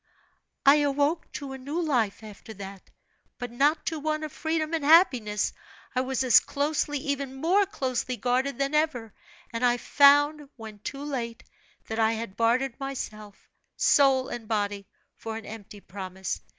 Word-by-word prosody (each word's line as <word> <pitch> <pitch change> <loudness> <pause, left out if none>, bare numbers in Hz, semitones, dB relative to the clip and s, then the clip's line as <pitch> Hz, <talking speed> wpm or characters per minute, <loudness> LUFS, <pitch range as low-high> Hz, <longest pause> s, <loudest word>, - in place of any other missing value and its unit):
"I 280 +2 +8
awoke 290 +2 0
to 280 -2 -6
a 265 - -8
new 285 +6 -4
life, 240 - 0
after 215 +1 -11
that; 195 -1 -10 0.5
but 245 -1 -6
not 285 +6 +2
to 320 - -2
one 310 +1 -2
of 305 - -5
freedom 315 +1 -2
and 320 -3 -1
happiness. 255 - +4 0.4
I 255 - +2
was 260 0 -1
as 250 -3 +7
closely, 295 +1 -1
even 280 -2 -3
more 365 +8 +2
closely, 255 - -2
guarded 250 +3 0
than 275 +1 -1
ever; 260 -8 0 0.4
and 230 +2 -3
I 245 0 +4
found, 290 +2 +4
when 220 -3 -10
too 275 +7 -6
late, 240 -6 -4 0.4
that 220 +1 -4
I 220 0 +3
had 225 -3 -5
bartered 235 +3 +1
myself, 215 -7 -7 0.3
soul 265 -2 +4
and 230 -2 -7
body, 205 -2 -2 0.3
for 225 -1 -6
an 225 - -9
empty 210 -1 -10
promise. 190 0 -6
260 Hz, 160 wpm, -27 LUFS, 225-290 Hz, 0.5 s, I